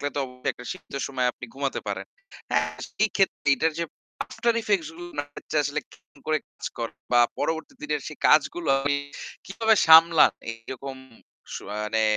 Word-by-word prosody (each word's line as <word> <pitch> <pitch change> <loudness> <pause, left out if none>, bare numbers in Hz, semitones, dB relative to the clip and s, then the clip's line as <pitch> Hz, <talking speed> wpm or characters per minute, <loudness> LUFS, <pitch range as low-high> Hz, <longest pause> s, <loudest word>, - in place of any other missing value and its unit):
তো - - 0
অবশ্যই 125 -1 -5
শীত্ত 185 - -11
সময়ে 125 -2 +1
আপনি 125 - -9
ঘুমাতে 135 0 -2
পারেন। - - -3 0.5
এ্যা - - +4 0.4
সেক্ষেত্রে 195 -7 +1
এটার 160 +3 +1
যে - - +1 0.4
আফটার 235 +1 0
ইফেক্টস 200 -7 +1
গুলো 175 0 -8
না - - 0 0.4
আসলে 145 +2 -1
কি - - -17 0.3
করে 155 0 +3 0.2
কাজ - - -7
কর 115 -1 -2 0.2
বা 120 - +6 0.2
পরবর্তী 160 +10 -2
দিনের 150 -1 -2
সেই 155 - -8
কাজগুলো 160 +2 +3
আপনি 145 +1 +1 0.5
কিভাবে 220 +3 +2
সামলান 160 0 +8 0.2
এরকম 130 +4 -8 0.6
সুআ 105 - -6
মানে 110 +1 +1
150 Hz, 155 wpm, -26 LUFS, 130-170 Hz, 0.6 s, সামলান